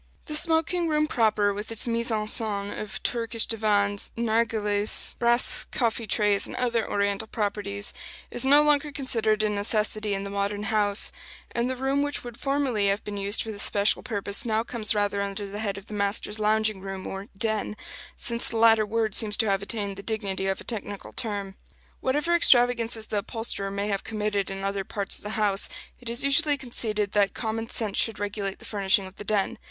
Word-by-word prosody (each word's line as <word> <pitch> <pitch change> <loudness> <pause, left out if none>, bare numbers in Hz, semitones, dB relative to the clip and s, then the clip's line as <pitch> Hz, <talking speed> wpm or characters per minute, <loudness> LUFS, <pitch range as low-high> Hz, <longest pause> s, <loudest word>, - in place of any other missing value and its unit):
The 305 - -6
smoking 330 +2 +2
room 305 -1 +2
proper, 215 -6 +1
with 210 +3 -6
its 225 - +1
mise 235 +1 0
en 215 -2 0
scène 205 -2 -1
of 210 -2 -6
Turkish 230 -1 0
divans, 205 -2 0
narghilehs, 220 -2 0
brass 240 +1 +3
coffee 230 -2 -2
trays, 205 -1 +2
and - - -8
other 235 -3 -1
Oriental 200 +1 -1
properties, 205 -2 -3 0.4
is - - +6
no 285 +3 +6
longer 295 0 +2
considered 225 -6 +1
a 215 - +2
necessity 210 0 0
in 195 - -4
the 200 - -6
modern 200 +1 -2
house; 205 -1 +2 0.4
and 235 +1 -1
the 260 - -2
room 270 +2 0
which 290 0 -2
would 240 -1 -9
formerly 275 -7 0
have 200 +1 0
been 210 - -6
used 200 +2 +1
for 225 - -6
this 205 -1 -3
special 205 +1 +2
purpose 200 -3 +2
now 225 -1 0
comes 225 -3 0
rather 205 -1 0
under 200 +1 -3
the 200 +1 -6
head 200 -2 -2
of 200 - -10
the - - -10
master's 205 +1 -1
lounging 215 -1 +1
room, 195 -1 -6
or 195 +1 -6
"den" 215 0 0 0.4
since 235 0 +4
the 225 - -3
latter 225 -1 +5
word 220 -1 -1
seems 210 0 +2
to 220 - +3
have 195 0 0
attained 200 -2 -4
the - - -6
dignity 200 -3 -2
of 195 - -1
a - - -8
technical 205 -3 -5
term. 200 -4 -4 0.5
Whatever 295 +6 0
extravagances 240 -7 +4
the 210 -1 -2
upholsterer 200 -1 -1
may 200 +1 -3
have 195 -1 -1
committed 210 -2 -2
in 195 0 -5
other 195 0 -2
parts 200 0 -2
of - - -18
the 210 +1 -5
house, 205 -2 +2 0.3
it 240 - -5
is 235 +2 0
usually 290 +1 +4
conceded 215 -6 -1
that 200 -1 +2
common 225 0 -3
sense 215 -5 +1
should 225 -3 +1
regulate 205 -1 -4
the - - -14
furnishing 195 -1 +1
of 190 0 -12
the - - -7
den. 205 -1 0
215 Hz, 195 wpm, -26 LUFS, 200-235 Hz, 0.5 s, is